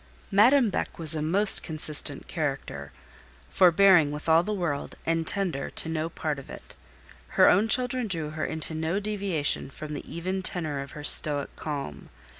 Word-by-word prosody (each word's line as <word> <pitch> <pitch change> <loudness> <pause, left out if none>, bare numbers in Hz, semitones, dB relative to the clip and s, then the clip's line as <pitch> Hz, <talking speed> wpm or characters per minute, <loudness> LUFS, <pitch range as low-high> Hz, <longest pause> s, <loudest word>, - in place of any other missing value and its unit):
Madame 235 +3 +3
Beck - - -4
was 160 -2 0
a 155 - -2
most 195 +7 +5
consistent 155 -2 -1
character; 135 - -5 0.6
forbearing 180 -3 +4
with 150 +2 -7
all 160 +1 +4
the 210 - -5
world, 170 -8 -4
and 165 -1 -2
tender 180 -9 -1
to - - -3
no 160 0 -3
part 155 -3 -5
of 135 - -14
it. - - -13 0.6
Her - - +6
own 200 +5 +3
children 250 0 +1
drew 160 -6 -4
her 155 0 -6
into 160 0 -1
no 160 +4 -3
deviation 195 -10 -2
from 150 +2 -9
the 145 - -9
even 185 +3 -4
tenor 160 -6 -2
of 140 - -11
her 150 - -10
stoic 145 -1 +5
calm. 140 - -7
160 Hz, 170 wpm, -25 LUFS, 150-190 Hz, 0.6 s, Her